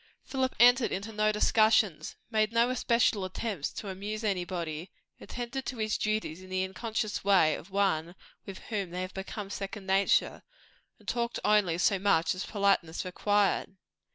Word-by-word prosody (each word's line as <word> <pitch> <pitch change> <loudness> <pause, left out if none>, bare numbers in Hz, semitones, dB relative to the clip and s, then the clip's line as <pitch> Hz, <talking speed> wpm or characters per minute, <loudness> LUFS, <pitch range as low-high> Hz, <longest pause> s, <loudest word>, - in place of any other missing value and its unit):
Philip 260 -1 -2
entered 245 +1 +6
into 205 +4 -4
no 215 0 +2
discussions, 215 -4 +2 0.2
made 215 0 +2
no 235 +2 +2
special 235 -5 +2
attempts 185 -3 -3
to 210 - -7
amuse 205 +4 -5
anybody, 175 -4 -3 0.3
attended 250 +2 -5
to 255 - -4
his 215 -1 -1
duties 215 -6 -2
in 185 - -13
the 185 0 0
unconscious 215 +3 -3
way 190 -6 +4
of 170 - -8
one 185 -4 0 0.3
with 195 -1 -8 0.2
whom 200 -4 -1
they 180 +1 -4
have 185 - -7
become 195 +1 -6
second 200 0 -6
nature, 195 +1 +2 0.6
and - - -23
talked 235 -1 -1
only 205 -6 +3
so 190 +2 +2
much 185 -4 +2
as 185 - -5
politeness 195 -6 +1
required. 200 +1 0
200 Hz, 155 wpm, -29 LUFS, 185-220 Hz, 0.6 s, entered